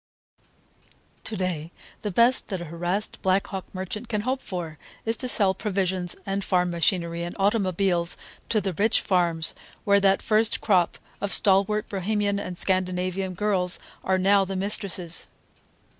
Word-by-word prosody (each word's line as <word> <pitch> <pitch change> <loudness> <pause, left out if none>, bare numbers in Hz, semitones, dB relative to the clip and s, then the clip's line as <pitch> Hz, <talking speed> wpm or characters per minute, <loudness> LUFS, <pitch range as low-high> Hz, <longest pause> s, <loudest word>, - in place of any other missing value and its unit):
To 220 - -3
day 175 -3 -3 0.3
the 210 - -2
best 235 +6 +3
that 190 -3 -3
a 175 - -6
harassed 175 +6 -3
Black 190 +1 +2
Hawk 190 -2 -6
merchant 195 +5 -6
can 210 -3 0
hope 260 +4 -1
for 165 -5 -6 0.3
is 225 0 +1
to 255 - -2
sell 200 -6 +4
provisions 190 -3 -2
and 195 0 -2
farm 180 -1 +1
machinery 170 0 0
and 175 - -5
automobiles 190 -4 +1 0.3
to 220 - +3
the 190 -2 -2
rich 215 +6 +2
farms 170 -4 +1 0.3
where 200 0 +4
that 195 0 +3
first 220 +1 +2
crop 185 -5 +2 0.2
of 200 0 -2
stalwart 200 +2 +4
Bohemian 200 +1 -1
and 180 -3 -6
Scandinavian 185 0 -1
girls 185 -2 +1 0.3
are 190 0 +2
now 195 +1 +4
the 195 0 -4
mistresses. 190 -3 +1
190 Hz, 150 wpm, -25 LUFS, 180-205 Hz, 0.3 s, sell